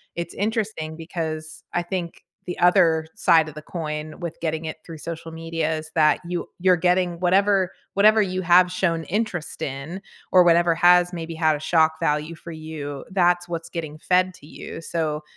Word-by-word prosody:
it's 170 0 -5
interesting 205 -7 -2
because 160 -1 -5
I 175 - 0
think 175 -1 -5 0.2
the 180 - -4
other 165 -2 +4
side 160 -1 +4
of 155 - -8
the 155 - -7
coin 155 -1 -5
with 170 -3 -6
getting 160 -1 -2
it 155 - -5
through 165 -2 -9
social 165 +1 -7
media 165 -1 -2
is 155 0 -8
that 155 -2 +4
you 175 0 -4
you're 185 0 +4
getting 180 0 +1
whatever 190 +1 +3 0.2
whatever 215 +2 +5
you 185 -1 -2
have 180 0 +5
shown 170 -3 0
interest 195 -3 -3
in 140 +8 -5 0.3
or 180 -1 +7
whatever 170 0 +4
has 180 +1 +5
maybe 165 -1 -5
had 160 -1 +2
a - - -6
shock 160 0 +2
value 150 +3 0
for 170 +1 -10
you. 155 -3 -7
That's 175 -2 +2
what's 170 -1 -5
getting 155 -2 -6
fed 185 +2 +2
to 145 - -16
you. 165 - -9
So, 155 -2 -2
170 Hz, 180 wpm, -23 LUFS, 155-180 Hz, 0.3 s, or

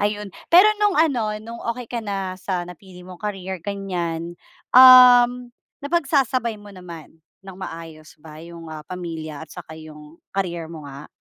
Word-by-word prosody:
ayun. 210 0 -2 0.2
Pero 360 +5 +8
no'ng 415 -2 +2
ano, 280 -8 +2 0.2
no'ng 230 +2 -10
okey 250 -1 -9
ka 235 0 -4
na 195 -3 -4
sa 185 -2 -4
napili 180 0 -13
mong 185 -1 -12
career 190 -4 -5
ganyan, 175 -4 -4 0.4
um, 250 -1 +8 0.3
napagsasabay 275 -7 0
mo 205 - -14
naman 170 -4 -11 0.3
ng 190 - -9
maayos 165 -4 -10
ba 155 0 -12
'yong, 170 -1 -11
ah, 155 - -8
pamilya 160 -4 -7
at - - -34
saka 160 0 -10
'yong 155 0 -14 0.2
career 175 -4 -3
mo 160 -2 -10
nga? 140 +1 -10
185 Hz, 155 wpm, -22 LUFS, 165-235 Hz, 0.4 s, Pero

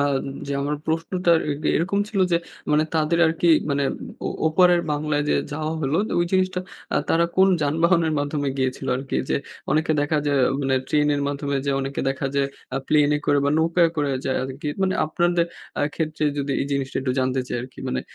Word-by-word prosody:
আ 145 - +3 0.4
যে 140 - -3
আমার 145 +1 -1
প্রশ্নটা 170 +2 0 0.2
এ - - +1 0.2
এরকম 190 +5 0
ছিল 210 -3 -1
যে - - +5 0.4
মানে 150 +1 +4
তাদের 160 +1 +2
আরকি 165 +2 +1 0.2
মানে 140 0 +1 0.4
ও - - 0 0.2
ওপারের 175 +2 +4
বাংলায় 145 0 0
যে - - +3 0.2
যাওয়া 155 +1 -2
হলো 140 +1 0 0.2
ওই 175 - +3
জিনিসটা 185 -1 +1 0.3
আ - - +3
তারা 170 +1 +3
কোন 190 +1 +6
যানবাহনের 165 +2 +2
মাধ্যমে 145 0 -1
গিয়েছিল 130 -1 -2
আরকি? 135 +1 -3
যে - - +3 0.3
অনেকে 155 +2 +2
দেখা 145 +1 +1
যায় 140 -1 +2 0.2
মানে 135 -1 +1
ট্রেনের 150 -1 +2
মাধ্যমে 140 0 -2
যে - - +2
অনেকে 135 +1 -3
দেখা 135 0 -2 0.5
আ - - 0
প্লেনে 150 -1 +4
করে 145 -1 +4
বা 140 - +2
নৌকায় 165 +1 +3
করে 145 -2 0
যায় 130 - 0
আরকি 135 +3 -5
মানে 190 0 +1
আপনাদের 175 +1 +1 0.3
আ - - +2
ক্ষেত্রে 155 -1 -2
যদি 140 0 -1
এই 140 - -1
জিনিসটা 135 -1 -2
একটু 130 -1 -1
জানতে 130 0 0
চাই - - -2
আরকি 130 +1 -12
মানে 65 - -1
150 Hz, 190 wpm, -23 LUFS, 140-165 Hz, 0.5 s, কোন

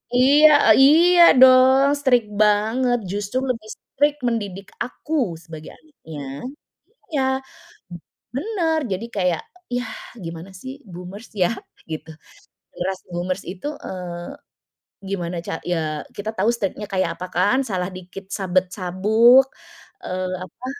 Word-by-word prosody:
Iya 290 -1 +6
iya 340 +5 +6 0.2
dong, 260 +1 +7
strict 245 -6 +2
banget, 220 +4 +2
justru 205 +4 -3
lebih 220 -3 -3
strict 290 +1 0
mendidik 200 -5 -3
aku 250 - -2
sebagai 160 -2 -11
anaknya, 160 - -12 0.9
iya, 270 - +2 0.7
b - - -8 0.4
benar 325 0 0
jadi 210 +5 -3
kayak, 180 -4 0 0.3
yah 245 -2 -3 0.3
gimana 165 +3 -7
sih 260 0 -7 0.2
boomers 180 +6 -10
ya, 180 +2 +3 0.4
gitu. 160 0 -7 0.6
Generasi 190 +1 -4
boomers 180 +2 -3
itu, 185 +10 -6 0.2
eee, 175 -2 -6 0.8
gimana 180 -3 -3
ca - - -3
ya 155 -4 -2
kita 215 +2 -3
tahu 205 +4 +1
state-nya 210 -2 -3
kayak 170 -3 0
apa 180 +2 -6
kan, 205 +9 +2
salah 185 -5 -2
dikit 185 +1 -10
sabet 185 -2 0
sabuk, 220 +8 +5 0.6
eee, 185 0 -3
apa, 240 +8 -11
200 Hz, 120 wpm, -22 LUFS, 180-255 Hz, 0.9 s, dong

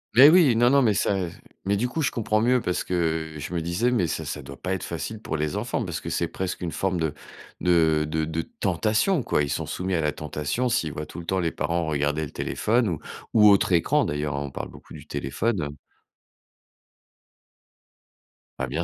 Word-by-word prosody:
Mais 140 +5 +10
oui, 160 -9 +6
non, 120 +1 +5
non, 140 +1 +5
mais 110 -4 +3
ça, 100 - +1
heu, 90 -3 -2
ze 85 - -13 0.3
mais 100 - +2
du 125 +5 0
coup, 160 - -2
je 145 - +1
comprends 110 -2 0
mieux 125 +2 +3
parce 90 - -1
que, 80 -3 -1
heu, 75 - -7
je 80 +5 -6
me 85 - 0
disais: 90 +9 0
«Mais 105 -9 +2
ça 80 - -3
ça 75 0 -5
doit 70 0 -9
pas 95 +1 -2
être 95 - -3
facile 85 +7 -5
pour - - -3
les 75 +5 -1
enfants», 120 +2 -2
parce 90 -1 -4
que 80 - -6
c'est 85 0 -1
presque 95 -1 -4
une 85 -2 -3
forme 95 -1 -1
de 80 -3 -1 0.5
de 80 -3 +3
de 80 0 0
de 80 +1 -2
tentation, 110 - 0
quoi. 75 - +1
Ils 70 - -3
sont - - -2
soumis 95 0 -2
à 80 - +1
la 75 -2 0
tentation 75 - -2
s'ils 80 - 0
voient 75 - -5
tout 85 - -9
le 85 - -8
temps 95 +2 0
les 85 -2 0
parents 85 0 -1
regarder 75 0 0
le 70 - -10
téléphone 115 +1 0
ou 80 - -3 0.3
ou 105 -2 +7
autre 100 -2 +4
écran 85 - +3
d'ailleurs, 75 -1 -2
hein, 70 - -2
on 70 - -7
parle - - -5
beaucoup - - -14
du - - -10
téléphone, 75 - -1
heu. 70 0 -5 2.8
Bah, 65 - -1
bien 80 +6 -2
85 Hz, 230 wpm, -25 LUFS, 75-110 Hz, 2.8 s, Mais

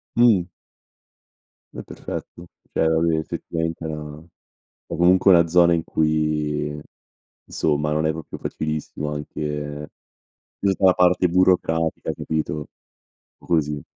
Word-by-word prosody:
Mh. 110 -7 +4 1.2
È - - -7
perfetto, 85 +1 -8 0.3
cioè 80 - +2
vabbè 80 +1 +2
effettivamente 80 +1 -4
è - - -2
una 75 -1 -6 0.7
o - - -5
comunque 90 +3 +5
è - - +8
una 85 0 +4
zona 85 0 +5
in 80 -1 -1
cui 75 -1 -1 0.6
insomma, 75 0 -1
non 75 +1 +1
è - - +2
proprio 80 -1 -8
facilissimo 75 -1 -4
anche 75 0 -5 0.7
giusto, 95 -1 0
la 95 - +7
parte 90 0 +3
burocratica, 85 -3 +1
capito, 75 -1 -3 0.7
o - - -19
così 75 -4 0
80 Hz, 120 wpm, -22 LUFS, 75-85 Hz, 1.2 s, è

